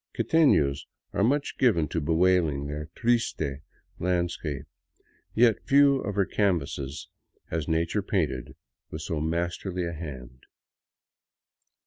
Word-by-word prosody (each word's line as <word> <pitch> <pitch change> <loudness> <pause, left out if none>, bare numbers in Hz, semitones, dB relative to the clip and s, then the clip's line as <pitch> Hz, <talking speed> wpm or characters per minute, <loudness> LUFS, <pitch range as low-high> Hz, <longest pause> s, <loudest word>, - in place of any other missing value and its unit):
Quitefios 75 - +3 0.3
are 100 - +1
much 140 +5 0
given 95 - +3
to 80 - -1
bewailing 80 -2 +2
their 75 +1 -5
" - - -48
triste 115 - 0 0.2
" - - -35
landscape; 85 -5 -2 0.7
yet 115 -1 +4
few 140 0 +6
of 100 -4 -4
her 100 -2 +2
canvases 75 -9 -1 0.4
has 80 -3 -2
Na 80 0 +2
ture 105 - -1
painted 85 - -2 0.3
with 75 +1 -6
so 80 -1 -2
masterly 85 +3 -2
a 85 - -4
hand. 65 -6 -9
85 Hz, 125 wpm, -27 LUFS, 75-100 Hz, 0.7 s, few